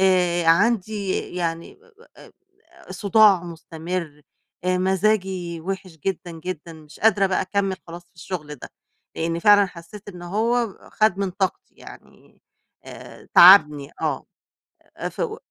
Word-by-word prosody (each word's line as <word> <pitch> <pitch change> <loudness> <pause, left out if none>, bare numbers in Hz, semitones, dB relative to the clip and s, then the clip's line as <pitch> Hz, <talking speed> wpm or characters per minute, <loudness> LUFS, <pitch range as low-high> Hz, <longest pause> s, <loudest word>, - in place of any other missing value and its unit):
آآ، 180 -3 +2
عندي 200 +2 +2 0.2
يعني 165 -2 -4 0.4
آآ، - - -16 0.6
صداع 205 -2 +4
مستمر 165 -2 -6 0.4
مزاجي 185 -2 0
وحش 185 0 -6
جدًا، 180 -2 -3
جدًا، 165 0 -7
مش 155 -1 -15
قادرة 210 -2 +3
بقى 190 - 0
أكمِّل 195 0 -2
خلاص 170 +1 -9
في - - -42
الشغل 165 -3 -7
ده، - - -11 0.5
لإني 165 +1 -2
فعلًا 205 0 +6
حسيت 180 +4 -13
إنه 175 -3 -9
هو 235 +2 +1 0.3
خد 215 -3 +2
من 200 -1 -1
طاقتي، 190 +1 -3
يعني - - -16 0.4
آآ، - - -13
تعبني، 150 -6 +7
آه - - -2 0.7
أ - - -4
ف - - -17
و 445 -1 -3
185 Hz, 130 wpm, -22 LUFS, 170-200 Hz, 0.7 s, تعبني